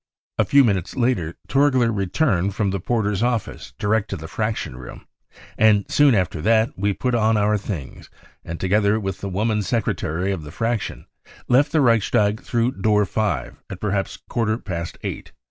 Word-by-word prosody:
A - - +4
few 140 0 +5
minutes 100 -7 0
later 120 - 0
Torgler 130 -4 +3
returned 100 - 0
from 100 -2 0
the 100 - -2
porter's 105 0 -1
office 120 -3 -2
direct 110 +1 0
to - - -3
the 80 - -8
Fraction 105 - -3
room, 65 0 -10 0.5
and 105 -2 +5
soon 145 -4 +5
after 90 -5 -1
that 110 +5 +3
we 100 +2 0
put 125 +5 -2
on 110 -1 +3
our 105 +1 +2
things 95 - -6 0.3
and, 85 0 -6
together 100 +3 +2
with 95 -3 -4
the 100 - -3
woman 105 +3 0
secretary 95 -5 -1
of 95 -4 -3
the 75 - -9
Fraction, 115 +4 -3 0.4
left 140 +4 +3
the 155 - +3
Reichstag 110 -3 +2
through 120 -3 -1
door 105 0 +3
5 95 - -2
at 95 - -7
perhaps 100 -2 -2
a - - -15
quarter 115 -2 0
past 85 -7 -5
eight. - - -6
105 Hz, 175 wpm, -22 LUFS, 95-115 Hz, 0.5 s, few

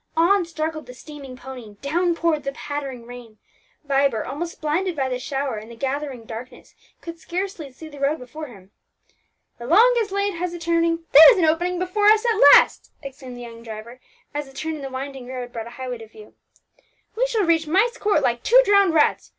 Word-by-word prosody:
On 360 +3 +3
struggled 315 -3 -4
the 250 - -11
steaming 275 -2 -11
pony, 250 -5 -10
down 340 +4 0
poured 330 -3 0
the 275 - -3
pattering 275 -5 -6
rain; 240 -3 -12 0.5
Vibert, 275 -5 +1
almost 330 +6 -6
blinded 330 +4 -1
by 270 -3 -1
the 250 -1 -3
shower 270 -2 -3
and 215 +2 -9
the 235 - -11
gathering 270 -1 -4
darkness, 230 +3 -10 0.3
could 335 0 -9
scarcely 355 -5 -5
see 315 +5 -12
the 290 -2 -12
road 280 +3 +1
before 300 +5 -9
him. 195 -6 -16 0.9
"The 235 - -7
longest 450 - +4
lane 400 -2 -1
has 350 0 -3
a - - -5
turning, 335 0 0
there 315 - +10
is 460 - +1
an 350 - +3
opening 350 +3 +1
before 370 +3 0
us 435 +2 +4
at 460 -1 +1
last!" - - +2
exclaimed 260 -2 -9
the - - -9
young 230 -1 -10
driver, 230 +2 -9 0.3
as 295 -1 -4
a 270 - -16
turn 320 +3 -4
in 305 - -7
the 270 - -5
winding 265 -1 -7
road 250 -1 -7
brought 230 -1 -6
a 235 - -12
highway 255 -2 -5
to 225 - -11
view. 215 -1 -15 0.8
"We - - +1
shall 450 -5 0
reach 325 -2 +2
Myst 440 +9 +1
Court 410 -8 +1
like 240 -2 0
two - - +5
drowned 400 -5 +4
rats. 300 - +2
295 Hz, 205 wpm, -22 LUFS, 250-345 Hz, 0.9 s, there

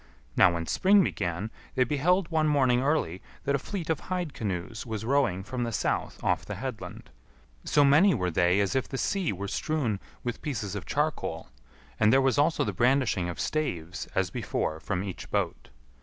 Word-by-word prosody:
Now 90 - +6
when 85 0 -2
spring 195 - +4
began, 85 - -2 0.2
they 130 - +4
beheld 160 +8 +1
one 155 -1 +2
morning 130 -4 +3
early, 130 - 0 0.2
that 140 - 0
a 140 - +2
fleet 180 +2 -5
of 160 - 0
hide 180 -5 -3
canoes 100 +1 -4
was 110 -2 -5
rowing 120 -8 +1
from 125 +3 -3
the 115 - -2
south 110 - -1
off - - +1
the - - -6
headland; - - -7 0.5
so 145 -1 +4
many 160 +8 +6
were 90 -5 -1
they 90 +4 +3
as 100 -2 0
if 130 - 0
the 135 - -3
sea 190 +4 0
were 100 +1 -4
strewn 120 -4 -1 0.2
with 120 -1 -4
pieces 115 -9 -3
of 95 -7 -5
charcoal, - - -2 0.5
and 110 0 +5
there 135 - +6
was 135 -1 +2
also 160 +3 +3
the 105 - -2
brandishing 120 -5 +2
of 85 - -6
staves 90 - -2
as - - +1
before 80 0 -2
from 90 +3 -2
each 95 -3 -7
boat. - - -2
120 Hz, 185 wpm, -28 LUFS, 95-150 Hz, 0.5 s, Now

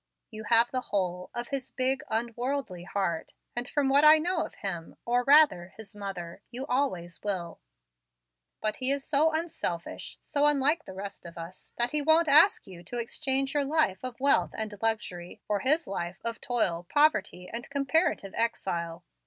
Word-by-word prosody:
You 220 0 -8
have 235 +1 +5
the 255 - -1
whole 180 -5 -2
of 240 0 -3
his 270 -2 -3
big, 260 +1 0
unworldly 235 -4 -3
heart, 190 -4 -2 0.2
and 240 +1 -2
from 290 -2 0
what 280 +2 +4
I 305 +1 +9
know 345 +3 -1
of - - -9
him, 175 -5 -4
or, 245 +1 +1
rather, 280 - +5
his 215 -2 -11
mother, 190 -4 -7
you 255 +3 -4
always 245 - -2
will; 185 -5 -3 1.0
but 215 0 -1
he 260 0 0
is 280 0 +1
so 310 +2 +3
unselfish 315 - -4
so 290 0 +2
unlike 295 +3 +2
the 190 - -9
rest 200 +1 -7
of 170 -1 -11
us 170 +2 -8
that 240 +1 +1
he 300 - +3
won't 315 +2 +4
ask 305 +8 +6
you 175 -2 -12
to 240 - -5
exchange 270 +3 0
your 290 -1 +1
life 275 -10 +1
of 255 -1 -6
wealth 280 +1 +4
and 220 -1 -4
luxury 185 -6 -2
for 205 -1 0
his 305 - +3
life 175 -1 -5
of 230 0 -3
toil, 185 -10 0
poverty, 210 -11 +2
and 235 +1 -5
comparative 280 - 0
exile. 175 -7 -2
235 Hz, 175 wpm, -28 LUFS, 190-280 Hz, 1.0 s, I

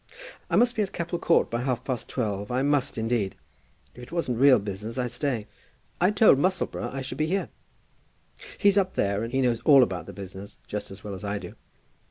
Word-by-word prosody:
"I - - +1
must 245 0 +4
be 220 - +1
at 195 -2 -2
Capel 170 0 -3
Court 170 - +2
by 120 +1 -1
half 125 -2 -1
past 130 -3 -4
twelve; 105 -5 -2
I 125 +2 0
must, 145 -3 +1
indeed. 110 -3 -1 0.6
If 125 - -12
it 125 - -11
wasn't 145 -9 -1
real 135 -1 +7
business, 105 +4 -5
I'd 125 -2 -1
stay." 125 -4 -2 0.6
"I 180 - +5
told 210 -8 +5
Musselboro 185 +4 0
I 135 - -4
should 130 +3 -6
be 155 - +1
here." 195 +4 -1 1.1
"He's 200 -1 +4
up 190 -1 -1
there, 100 +2 0
and 115 - -4
he 135 +1 +1
knows 120 -3 +1
all 140 0 +7
about 90 -7 -3
the - - -7
business 95 0 -9
just 105 - -5
as 95 +2 -11
well 105 - -6
as 95 - -8
I 100 0 -2
do. - - -8
125 Hz, 215 wpm, -26 LUFS, 105-155 Hz, 1.1 s, real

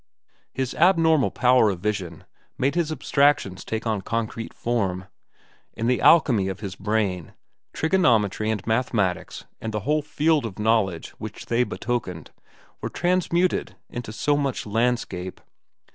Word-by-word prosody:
His 130 -1 -3
abnormal 160 -4 +4
power 125 -2 +4
of 95 -3 -3
vision 90 -5 -3 0.3
made 140 +4 +1
abstractions 145 - +1
take 110 +1 -4
on 110 -3 0
concrete 115 +1 -3
form. 95 -6 -2 0.7
In 115 - -3
the 125 +1 +1
alchemy 125 - +5
of 95 +1 -4
his 95 -3 -5
brain, 100 -4 -1 0.4
trigonometry 115 - +2
and 105 -3 -2
mathematics 110 -5 -1 0.2
and 110 - -3
the 105 -1 -2
whole 150 +7 +1
field 150 +1 +1
of 95 - -10
knowledge 105 -6 +1
which - - -7
they 120 +1 +2
betokened 110 -10 -4 0.5
were - - -3
transmuted 180 0 0 0.2
into 120 -3 -6
so 145 +6 +1
much 140 -3 -1
landscape. 110 -5 -1
115 Hz, 130 wpm, -24 LUFS, 100-140 Hz, 0.7 s, alchemy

